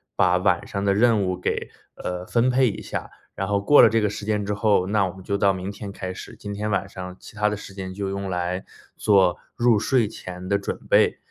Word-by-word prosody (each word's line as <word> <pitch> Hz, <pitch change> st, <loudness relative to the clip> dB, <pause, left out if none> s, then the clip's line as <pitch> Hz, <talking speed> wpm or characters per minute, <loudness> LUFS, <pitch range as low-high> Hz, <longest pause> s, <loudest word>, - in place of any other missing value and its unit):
把 90 Hz, 0 st, +4 dB
晚 90 Hz, -1 st, +1 dB
上 100 Hz, -, -3 dB
的 100 Hz, -1 st, +3 dB
任 110 Hz, 0 st, +3 dB
务 90 Hz, -1 st, -1 dB
给， 90 Hz, -, -2 dB, 0.3 s
呃， 90 Hz, 0 st, -5 dB
分 120 Hz, +5 st, +2 dB
配 130 Hz, 0 st, +3 dB
一 -, -, -6 dB
下。 -, -, -5 dB, 0.3 s
然 95 Hz, +1 st, -3 dB
后 100 Hz, -1 st, +2 dB
过 105 Hz, +9 st, +6 dB
了 -, -, +8 dB
这 115 Hz, +1 st, +2 dB
个 105 Hz, -1 st, +1 dB
时 105 Hz, -, -6 dB
间 105 Hz, -1 st, 0 dB
之 105 Hz, -, -1 dB
后， 100 Hz, -3 st, +2 dB
那 105 Hz, 0 st, +2 dB
我 90 Hz, -, -7 dB
们 95 Hz, -, -12 dB
就 100 Hz, +1 st, -1 dB
到 100 Hz, 0 st, +4 dB
明 95 Hz, 0 st, -4 dB
天 100 Hz, 0 st, -7 dB
开 95 Hz, -1 st, -5 dB
始， -, -, -10 dB
今 100 Hz, -1 st, -6 dB
天 105 Hz, +1 st, -3 dB
晚 100 Hz, -1 st, 0 dB
上 90 Hz, -1 st, -8 dB
其 -, -, -13 dB
它 105 Hz, 0 st, +2 dB
的 105 Hz, -, -3 dB
时 100 Hz, -, -10 dB
间 95 Hz, -1 st, -6 dB
就 100 Hz, +1 st, -3 dB
用 100 Hz, 0 st, -3 dB
来 90 Hz, +1 st, -2 dB, 0.3 s
做 95 Hz, -4 st, +3 dB, 0.2 s
入 120 Hz, -2 st, +4 dB
睡 120 Hz, 0 st, +2 dB
前 90 Hz, -3 st, -8 dB
的 100 Hz, -, +2 dB
准 100 Hz, -, -4 dB
备。 -, -, +4 dB
100 Hz, 265 characters per minute, -24 LUFS, 95-105 Hz, 0.3 s, 了